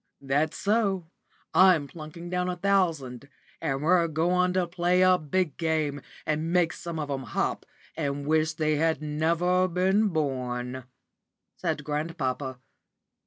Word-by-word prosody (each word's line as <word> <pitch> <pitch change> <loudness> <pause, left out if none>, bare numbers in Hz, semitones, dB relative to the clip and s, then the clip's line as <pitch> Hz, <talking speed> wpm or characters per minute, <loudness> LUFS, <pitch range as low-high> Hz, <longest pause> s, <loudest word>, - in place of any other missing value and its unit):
"That's 145 +3 0
so! 195 -5 0 0.4
I'm 185 -6 +6
planking 165 +3 -9
down 180 0 0
a 180 - -2
thousand; 165 -9 0 0.3
and 135 +1 -1
we're 170 +1 +4
goin' 180 +3 +1
to 185 -1 +2
play 175 +1 +2
a 185 -1 +5
big 155 0 -1
game 155 -3 -1 0.2
and 155 +2 -1
make 175 -2 +3
some 170 -1 -6
of 150 -2 -3
'em 135 -1 -2
hop, - - -2 0.3
and 145 -2 -2
wish 155 +1 +2
they 155 -2 0
had 160 0 +1
never 170 +4 +1
been 190 +4 +2
born," 130 -6 -2 0.7
said - - -2
grandpapa. 140 -4 -3
160 Hz, 135 wpm, -27 LUFS, 145-180 Hz, 0.7 s, I'm